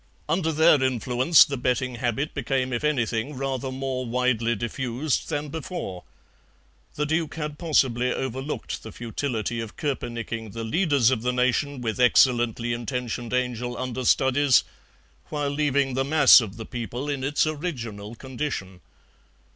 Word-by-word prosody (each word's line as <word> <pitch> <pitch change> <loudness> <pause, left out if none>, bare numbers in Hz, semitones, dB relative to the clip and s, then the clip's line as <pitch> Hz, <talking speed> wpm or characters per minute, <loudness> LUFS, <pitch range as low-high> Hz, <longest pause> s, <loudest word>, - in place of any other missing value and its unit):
Under 160 +1 +1
their 160 -2 +5
influence 130 +4 +4
the 140 - -4
betting 125 0 -1
habit 125 +4 -1
became 130 -2 -1
if 120 - -2
anything 130 -2 0
rather 135 -1 -3
more 130 -1 -3
widely 120 -1 +1
diffused 120 +5 -2
than 150 -1 -2
before. 160 - -5 0.9
The 150 - 0
Duke 160 +1 -1
had 150 -2 -5
possibly 125 -7 +2
overlooked 135 +3 -4
the 110 - -9
futility 115 0 -3
of 115 -2 -7
koepenicking 115 -6 -4
the 115 0 -5
leaders 140 -1 +2
of 120 -4 0
the 125 +1 0
nation 125 +2 0
with 115 0 -3
excellently 120 -2 +3
intentioned 120 -1 -4
angel 125 -1 -1
under 130 0 -3
studies, 130 +2 +4 0.7
while 145 -2 -2
leaving 140 -2 +1
the 135 +1 +1
mass 145 -2 +7
of 110 -2 -7
the 110 - -6
people 120 +3 -5
in 140 -2 -2
its 145 +3 +2
original 120 - -5
condition. 120 -8 -5
130 Hz, 140 wpm, -25 LUFS, 120-145 Hz, 0.9 s, mass